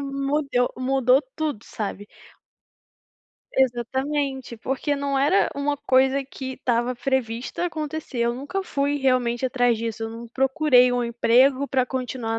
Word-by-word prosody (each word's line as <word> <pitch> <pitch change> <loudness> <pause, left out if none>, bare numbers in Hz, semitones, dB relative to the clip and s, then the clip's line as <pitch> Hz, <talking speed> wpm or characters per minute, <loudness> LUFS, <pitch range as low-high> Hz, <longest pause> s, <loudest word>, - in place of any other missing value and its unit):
mudeu 275 -2 0
mudou 260 0 +3 0.2
tudo, 300 -9 -2
sabe. 205 -2 -6 1.5
Exatamente, 265 +1 -1
porque 265 +5 -2
não 280 -1 -1
era 295 +9 +3
uma 285 +1 -1
coisa 265 +1 +2
que 265 -1 -7
estava 240 0 0
prevista 255 +4 -2
acontecer, 310 -5 -5
eu 235 0 +2
nunca 285 +10 -4
fui 285 -5 -1
realmente 255 -3 +1
atrás 245 -2 +2
disso, 225 0 -4
eu 225 - -5
não 230 +1 -8
procurei 265 0 +4
um 245 -1 0
emprego 255 +4 +3
para 260 -2 +2
continuar 250 -3 -3
260 Hz, 130 wpm, -24 LUFS, 240-280 Hz, 1.5 s, procurei